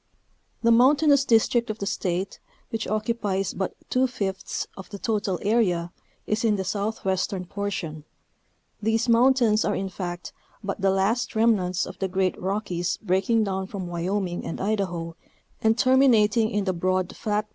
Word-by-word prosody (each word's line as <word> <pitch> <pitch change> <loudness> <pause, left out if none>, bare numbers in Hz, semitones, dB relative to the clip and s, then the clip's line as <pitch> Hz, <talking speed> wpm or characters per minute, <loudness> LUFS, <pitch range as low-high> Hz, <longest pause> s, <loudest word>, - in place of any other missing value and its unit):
The 230 - +5
mountainous 280 +4 +5
district 235 0 +3
of 215 - -3
the 200 - -4
State, 185 0 -2 0.3
which 225 -1 -3
occupies 210 -3 -1
but 190 - -3 0.2
two 255 +1 +3
fifths 195 -6 -3
of 190 - -10
the 205 - -7
total 205 -3 -1
area, 185 -6 +1 0.3
is 215 +2 -1
in 220 -2 +3
the 190 - -2
southwestern 190 -1 -2
portion; 175 -6 -4 0.8
these 225 +2 +1
mountains 235 -2 +4
are 210 - 0
in 195 0 -2
fact 175 -1 -6 0.3
but 195 0 -4
the 195 - +3
last 195 +6 0
remnants 200 -6 +2
of - - -10
the 190 - 0
great 190 0 0
rockies 185 -2 -2
breaking 205 +3 +1
down 190 -2 -2
from 195 -2 -5
Wyoming 175 +1 -2
and - - -5
Idaho 180 -5 -2 0.5
and 220 +1 +3
terminating 230 -4 +4
in 205 -1 -1
the 190 -1 0
broad 185 +1 -1
flat. 210 0 -1
200 Hz, 155 wpm, -25 LUFS, 185-225 Hz, 0.8 s, The